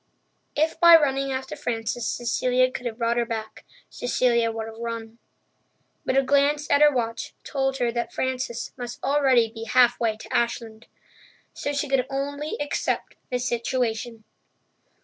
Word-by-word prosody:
If 315 Hz, +2 st, +1 dB
by 340 Hz, -1 st, +9 dB
running 275 Hz, -3 st, +2 dB
after 265 Hz, 0 st, -4 dB
Frances 225 Hz, 0 st, -3 dB
Cecilia 255 Hz, +1 st, +1 dB
could 245 Hz, -1 st, -4 dB
have 225 Hz, -2 st, -5 dB
brought 235 Hz, 0 st, 0 dB
her 240 Hz, -, +2 dB
back, 220 Hz, -2 st, -5 dB, 0.2 s
Cecilia 235 Hz, -2 st, +1 dB
would 225 Hz, 0 st, -4 dB
have 225 Hz, 0 st, -10 dB
run. 230 Hz, -1 st, -6 dB, 0.9 s
But 260 Hz, -, +2 dB
a 270 Hz, -, +5 dB
glance 285 Hz, +2 st, +2 dB
at 285 Hz, 0 st, +4 dB
her 300 Hz, 0 st, +7 dB
watch 230 Hz, -4 st, -3 dB
told 270 Hz, -1 st, -1 dB
her 240 Hz, -2 st, +1 dB
that 235 Hz, 0 st, -3 dB
Frances 255 Hz, -2 st, -3 dB
must 245 Hz, -2 st, -6 dB
already 265 Hz, -5 st, +3 dB
be 225 Hz, 0 st, -7 dB
halfway 240 Hz, -2 st, +3 dB
to -, -, -7 dB
Ashland. 230 Hz, -1 st, -2 dB, 0.7 s
So 285 Hz, -, -3 dB
she 290 Hz, +1 st, -1 dB
could 265 Hz, -2 st, +1 dB
only 285 Hz, +2 st, -3 dB
accept 290 Hz, 0 st, -2 dB, 0.2 s
the 250 Hz, -, 0 dB
situation. 240 Hz, -2 st, -2 dB
245 Hz, 150 wpm, -25 LUFS, 230-270 Hz, 0.9 s, by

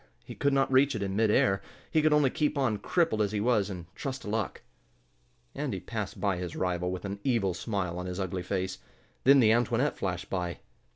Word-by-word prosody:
He -, -, -8 dB
could 140 Hz, -, +1 dB
not 135 Hz, -1 st, +2 dB
reach 135 Hz, +2 st, +4 dB
it 100 Hz, -, -2 dB
in 95 Hz, -1 st, -2 dB
mid 110 Hz, +1 st, +3 dB
air. 95 Hz, -2 st, +3 dB, 0.3 s
He 155 Hz, -, +3 dB
could 155 Hz, 0 st, +3 dB
only 150 Hz, -3 st, +4 dB
keep 150 Hz, -1 st, 0 dB
on, 120 Hz, -7 st, +1 dB
crippled 160 Hz, -, +1 dB
as 105 Hz, 0 st, 0 dB
he 105 Hz, -, 0 dB
was, 105 Hz, -2 st, +2 dB
and 90 Hz, -3 st, -6 dB
trust 135 Hz, +4 st, -5 dB
to -, -, -6 dB
luck. 110 Hz, -2 st, -2 dB, 0.9 s
Andy -, -, -3 dB
passed -, -, -5 dB
by 100 Hz, -3 st, +1 dB
his 90 Hz, -2 st, -5 dB
rival 90 Hz, -1 st, -1 dB
with 95 Hz, +1 st, -5 dB
an 100 Hz, +1 st, -4 dB
evil 115 Hz, -8 st, +1 dB
smile 90 Hz, -2 st, -3 dB
on 90 Hz, -, -4 dB
his 90 Hz, +1 st, -4 dB
ugly 95 Hz, -1 st, -2 dB
face. 95 Hz, 0 st, -3 dB, 0.5 s
Then 140 Hz, +1 st, +8 dB
the 110 Hz, -4 st, +6 dB
Antoinette 120 Hz, +4 st, +2 dB
flashed 90 Hz, -1 st, -2 dB
by. 90 Hz, -2 st, -3 dB
100 Hz, 215 wpm, -29 LUFS, 95-130 Hz, 0.9 s, Then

